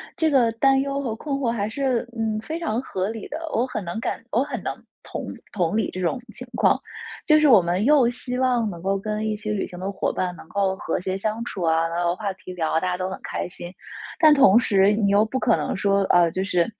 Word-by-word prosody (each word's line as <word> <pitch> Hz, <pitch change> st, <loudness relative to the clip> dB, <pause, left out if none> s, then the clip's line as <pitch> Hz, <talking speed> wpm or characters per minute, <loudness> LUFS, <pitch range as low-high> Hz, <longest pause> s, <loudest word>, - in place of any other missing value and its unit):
这 320 Hz, -1 st, +2 dB
个 245 Hz, -5 st, +3 dB
担 270 Hz, +3 st, +3 dB
忧 280 Hz, +1 st, -1 dB
和 230 Hz, -5 st, -3 dB
困 280 Hz, +3 st, -3 dB
惑 255 Hz, -4 st, 0 dB
还 210 Hz, -3 st, -1 dB
是， 250 Hz, 0 st, -1 dB
嗯， 220 Hz, -1 st, -1 dB
非 320 Hz, +8 st, -5 dB
常 245 Hz, -9 st, -1 dB
合 190 Hz, -6 st, -3 dB
理 225 Hz, -2 st, -6 dB
的， 310 Hz, -, -5 dB, 0.2 s
我 235 Hz, +3 st, +2 dB
很 215 Hz, -6 st, -5 dB
能 175 Hz, +6 st, -4 dB
感 230 Hz, -, -3 dB
我 245 Hz, +4 st, +2 dB
很 290 Hz, -, -5 dB
能 -, -, -2 dB, 0.3 s
同 -, -, -6 dB, 0.3 s
同 180 Hz, 0 st, 0 dB
理 220 Hz, -, +1 dB
这 185 Hz, -, -6 dB
种 185 Hz, +8 st, -1 dB
情 255 Hz, +2 st, -10 dB
况。 -, -, +3 dB, 0.5 s
就 310 Hz, -1 st, +5 dB
是 305 Hz, -, +4 dB
我 225 Hz, -7 st, +8 dB
们 175 Hz, +3 st, 0 dB
又 280 Hz, -2 st, +5 dB
希 250 Hz, +1 st, -4 dB
望 245 Hz, -4 st, +1 dB
能 170 Hz, -2 st, -8 dB
够 195 Hz, 0 st, 0 dB
跟 215 Hz, +1 st, -3 dB
一 215 Hz, -, -1 dB
些 210 Hz, 0 st, -4 dB
旅 205 Hz, -, -1 dB
行 180 Hz, -, -10 dB
的 195 Hz, +2 st, -3 dB
伙 195 Hz, -, -2 dB
伴 180 Hz, -1 st, -2 dB
能 160 Hz, -, -13 dB
够 190 Hz, +1 st, 0 dB
和 -, -, -2 dB
谐 185 Hz, +1 st, -3 dB
相 215 Hz, +3 st, -2 dB
处 190 Hz, -6 st, -5 dB
啊， 165 Hz, 0 st, +2 dB
能 170 Hz, +1 st, -4 dB
有 175 Hz, 0 st, +1 dB
话 200 Hz, -1 st, -3 dB
题 185 Hz, -1 st, -10 dB
聊 160 Hz, -3 st, -2 dB
啊， 160 Hz, -, +3 dB
大 185 Hz, -, -2 dB
家 180 Hz, -, 0 dB
都 185 Hz, 0 st, -2 dB
很 190 Hz, -, -6 dB
开 -, -, -3 dB
心。 175 Hz, 0 st, -9 dB, 0.5 s
但 310 Hz, -3 st, +7 dB
同 265 Hz, -7 st, +6 dB
时 200 Hz, -3 st, +3 dB
你 205 Hz, -2 st, +1 dB
又 205 Hz, +2 st, +4 dB
不 260 Hz, +4 st, -3 dB
可 230 Hz, -, +3 dB
能 -, -, -2 dB
说， 200 Hz, 0 st, +2 dB
呃， 175 Hz, -2 st, +4 dB
就 185 Hz, +3 st, -2 dB
是 180 Hz, +1 st, +1 dB
215 Hz, 275 characters per minute, -23 LUFS, 185-250 Hz, 0.5 s, 我